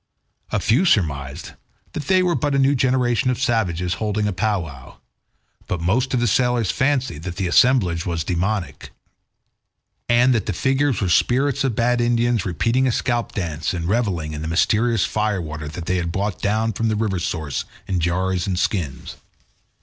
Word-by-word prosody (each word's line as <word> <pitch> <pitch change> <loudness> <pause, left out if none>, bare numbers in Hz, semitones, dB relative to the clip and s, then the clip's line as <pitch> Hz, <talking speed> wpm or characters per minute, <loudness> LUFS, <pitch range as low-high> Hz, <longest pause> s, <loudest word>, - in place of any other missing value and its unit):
A - - +1
few 120 - +2
surmised 70 - 0 0.4
that 150 - -5
they 185 -1 +4
were 180 -1 +2
but 145 -3 0
a - - +3
new 135 +1 +4
generation 125 -1 +1
of 125 - -1
savages 95 - 0
holding 105 -1 0
a 105 - -1
powwow, 90 -10 -3 0.7
but 90 - -2
most 120 +11 0
of - - +1
the 120 - +1
sailors 120 -1 +2
fancied 130 - 0
that 90 +1 -6
the 95 - -2
assemblage 90 -5 +3
was 85 -3 -2
demoniac, 95 +3 -2 1.2
and 120 +2 +4
that 115 -5 -1
the 105 - -1
figures 135 +5 +1
were 95 - 0
spirits 135 +9 +2
of 130 -5 0
bad 120 +1 +1
Indians 120 -3 +1
repeating 115 +9 +1
a - - +2
scalp 120 0 -1
dance 80 -4 -3
and 85 -1 -3
revelling 95 -8 -1
in 75 - -5
the 80 - -4
mysterious 105 +5 +2
fire 105 0 -1
water 75 -2 -6
that 80 +3 -7
they 90 +1 0
had 85 -1 -2
brought 100 +2 -2
down 110 +2 0
from 115 +3 -1
the 110 - 0
river 105 -4 -1
source 80 -4 -3 0.2
in 95 -2 -1
jars 90 +2 0
and 95 -2 -1
skins. 85 -6 -2
105 Hz, 180 wpm, -21 LUFS, 85-120 Hz, 1.2 s, they